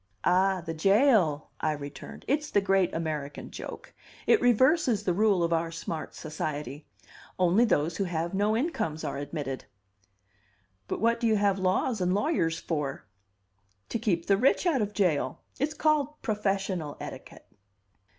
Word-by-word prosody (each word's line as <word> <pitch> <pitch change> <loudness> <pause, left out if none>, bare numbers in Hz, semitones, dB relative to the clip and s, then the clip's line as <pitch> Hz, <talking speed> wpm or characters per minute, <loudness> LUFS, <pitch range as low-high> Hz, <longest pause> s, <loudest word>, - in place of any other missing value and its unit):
"Ah, 185 +1 +3
the 165 - -3
jail!" 195 - +3
I 155 - 0
returned. 145 -1 -9
"It's 295 +2 0
the 205 - +3
great 195 -2 +2
American 155 -3 -4
joke. - - -8 0.3
It 445 - +4
reverses 245 - +3
the 180 - +1
rule 200 -2 +3
of 170 0 +1
our 165 0 0
smart 165 -1 -5
society. 150 -2 -5 0.5
Only 185 +6 +4
those 160 -6 +1
who 195 - 0
have 170 0 -2
no 205 +3 +2
incomes 195 - -2
are 140 - -3
admitted." 145 -2 -5 1.2
"But - - -3
what 230 +1 +2
do 235 - +1
you 220 - +3
have 200 -2 +2
laws 190 +4 +1
and 180 +1 +2
lawyers 205 - +1
for?" 150 -5 -3 0.8
"To 230 - -2
keep 170 -7 0
the 195 - +3
rich 265 - +3
out 305 -9 +2
of 210 0 -1
jail. 180 -8 0 0.2
It's 300 +3 -1
called 300 -1 +1
'professional 195 - -1
etiquette. - - -9
190 Hz, 150 wpm, -28 LUFS, 160-225 Hz, 1.2 s, It